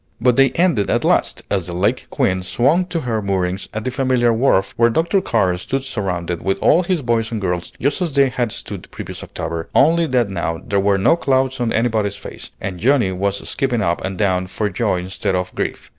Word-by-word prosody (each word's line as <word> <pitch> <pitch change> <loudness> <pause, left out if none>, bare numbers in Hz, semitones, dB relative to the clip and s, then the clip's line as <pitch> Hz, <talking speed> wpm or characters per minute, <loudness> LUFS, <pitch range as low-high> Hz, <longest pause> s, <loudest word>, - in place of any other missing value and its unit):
But 125 +1 +3
they 135 +1 +5
ended 170 - +2
at - - +1
last, - - +1
as 95 -4 0
the 90 - -5
"Lake 90 +4 0
Queen" 95 0 0
swung 140 - +2
to 175 -2 -3
her 115 -5 -1
moorings 95 -1 -2
at 110 - -4
the 130 - -1
familiar 125 -3 +2
wharf, 110 -5 +2
where 115 0 +4
Dr. 165 - +1
Carr 95 - +1
stood 135 +9 -3
surrounded 90 -8 -3
with 95 0 0
all 165 - +4
his 180 -4 -1
boys 115 -2 0
and 115 - -2
girls 90 -3 -2
just 140 +7 0
as 175 -3 0
they 140 -1 +4
had 120 -3 -2
stood - - -6
the - - -17
previous - - -7
October, 80 0 -5
only 165 +4 +4
that 120 -6 +1
now 85 -3 -2
there 100 - 0
were 100 0 +2
no 100 +12 +4
clouds 135 -4 0
on 120 -2 0
anybody's 110 -4 0
face, 100 - -9
and 90 -2 -5
Johnnie 120 -3 +3
was 100 +2 -2
skipping 125 -6 0
up 85 -1 0
and 95 -1 -4
down 95 -2 +1
for 105 +3 -2
joy 90 - 0
instead 95 +1 -2
of 90 0 -2
grief. - - -4
110 Hz, 220 wpm, -19 LUFS, 95-130 Hz, -, they